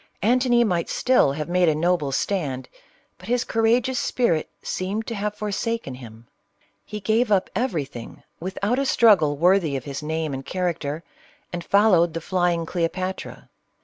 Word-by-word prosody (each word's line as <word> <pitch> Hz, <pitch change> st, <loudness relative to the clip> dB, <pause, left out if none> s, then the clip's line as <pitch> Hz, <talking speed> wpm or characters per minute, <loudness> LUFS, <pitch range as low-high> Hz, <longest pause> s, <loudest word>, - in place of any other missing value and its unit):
Antony 240 Hz, +1 st, +4 dB
might 180 Hz, -6 st, 0 dB
still 250 Hz, -, +3 dB
have 150 Hz, +1 st, -4 dB
made 180 Hz, -1 st, +3 dB
a 155 Hz, -, +1 dB
noble 160 Hz, -3 st, +1 dB
stand, 140 Hz, -5 st, -2 dB, 0.5 s
but -, -, -12 dB
his 245 Hz, +1 st, +1 dB
courageous 235 Hz, +3 st, +1 dB
spirit 170 Hz, -11 st, 0 dB
seemed 200 Hz, +4 st, -3 dB
to 235 Hz, -, -4 dB
have 210 Hz, 0 st, -3 dB
for 210 Hz, 0 st, -4 dB
saken 225 Hz, -, -3 dB
him. 115 Hz, -2 st, -12 dB, 0.6 s
He 210 Hz, -, -7 dB
gave 220 Hz, +2 st, +1 dB
up 195 Hz, -2 st, +2 dB
everything 155 Hz, -, -3 dB, 0.2 s
without 200 Hz, +7 st, -1 dB
a -, -, +2 dB
strug 230 Hz, -7 st, +5 dB
gle 145 Hz, -2 st, 0 dB
worthy 175 Hz, -2 st, +3 dB
of 130 Hz, -, -7 dB
his 140 Hz, +1 st, -6 dB
name 155 Hz, -1 st, -2 dB
and 135 Hz, 0 st, -5 dB
character, 170 Hz, -3 st, -3 dB, 0.5 s
and 175 Hz, -1 st, -4 dB
followed 180 Hz, -5 st, +4 dB
the -, -, -1 dB
flying 175 Hz, -1 st, 0 dB
Cleopatra. 185 Hz, +2 st, -3 dB
180 Hz, 160 wpm, -23 LUFS, 155-220 Hz, 0.6 s, strug